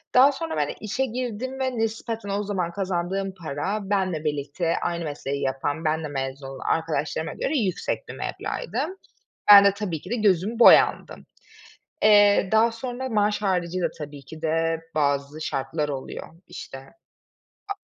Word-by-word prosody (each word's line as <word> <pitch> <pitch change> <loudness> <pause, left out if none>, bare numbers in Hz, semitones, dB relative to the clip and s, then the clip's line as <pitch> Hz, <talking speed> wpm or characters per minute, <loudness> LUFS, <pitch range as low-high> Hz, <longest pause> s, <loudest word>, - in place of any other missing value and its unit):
Daha 265 +3 +8
sonra, 320 +4 -4
böyle, 145 -1 -1
işe 220 +6 -1
girdim 255 +1 -4
ve 260 -2 -1
nispeten 225 -1 -3
o 200 +1 -1
zaman 190 -4 -2
kazandığım 190 +1 -2
para 160 +8 -2
benle 185 -6 0
birlikte 150 +3 -1
aynı 170 -1 -2
mesleği 140 -2 -4
yapan, 135 +4 -2
benle 155 0 0
mezun 135 -1 -4
olan 135 0 -8
arkadaşlarıma 160 0 -1
göre 295 +2 -1
yüksek 195 -8 -2
bir - - -5
meblağ - - -4
idi. - - -6 0.7
Ben 200 -1 +11
de, 200 - +5
tabii 195 -7 -4
ki 180 - -11
de 240 - 0
gözümü 210 0 +1
boyandım. 240 - +5 0.8
Eee, 205 -2 +6
daha 225 +1 +4
sonra 245 +2 -5
maaş 210 -2 +1
haricî 185 -2 0
de - - 0
tabii 145 -2 -8
ki 155 +4 -11
de 165 0 0
bazı 145 0 0
şartlar 140 +3 -2
oluyor 135 -2 -6 0.2
işte. 135 - -9 0.9
A 400 - -2
185 Hz, 155 wpm, -25 LUFS, 155-215 Hz, 0.9 s, Ben